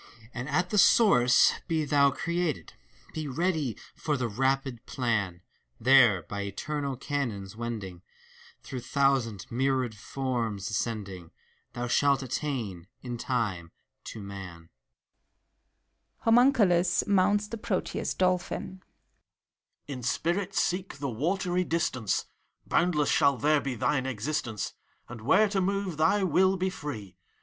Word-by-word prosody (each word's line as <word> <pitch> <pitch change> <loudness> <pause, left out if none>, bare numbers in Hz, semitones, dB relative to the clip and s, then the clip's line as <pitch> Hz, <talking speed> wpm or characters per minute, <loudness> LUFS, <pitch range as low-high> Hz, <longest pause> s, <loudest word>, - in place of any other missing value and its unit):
And 125 +3 -5
at 180 +5 0
the 210 - +3
source 150 - +6
be 160 -2 0
thou 140 -1 +4
created! 170 +1 -2 0.4
Be 155 -2 -4
ready 155 - -1 0.2
for 150 -2 -2
the 125 -2 -1
rapid 130 +1 -1
plan! 105 -9 -1 0.4
There, 120 -7 +5
by 100 +5 -5
eternal 140 +7 -3
canons 115 -9 -3
wending. 110 -6 -5 0.6
Through 130 - -6
thousand, 125 -4 0
myriad 130 -1 0
forms 115 -2 -3
ascending. 100 -6 -3 0.4
Thou 120 0 -3
shalt 140 +2 +2
attain, 120 - -4 0.2
in 120 -2 -5
time, 105 -10 -2 0.3
to - - -7
Man. 90 -4 -9 1.5
(HOMUNCULUS 225 -7 +4
mounts 205 +1 +2
the 230 - -6
Proteus 195 -3 -2
Dolphin.) 185 +1 -1
PROTBUS. - - -36 1.0
In 135 -3 -6
spirit 170 - -1
seek 180 0 -1
the 140 -2 -3
watery 180 - 0
distance! 145 - -1 0.4
Boundless 165 -4 +2
shaU 140 -2 +4
there 150 +3 +3
be 135 -2 -3
thine 130 +2 0
existence, 125 -2 -3 0.3
And 120 -2 -9
where 210 - +4
to 195 -1 0
move, 195 -3 -1
thy 165 +6 +3
will 190 +2 +3
be 185 +1 -1
free. 110 - -7
135 Hz, 125 wpm, -28 LUFS, 115-175 Hz, 1.5 s, source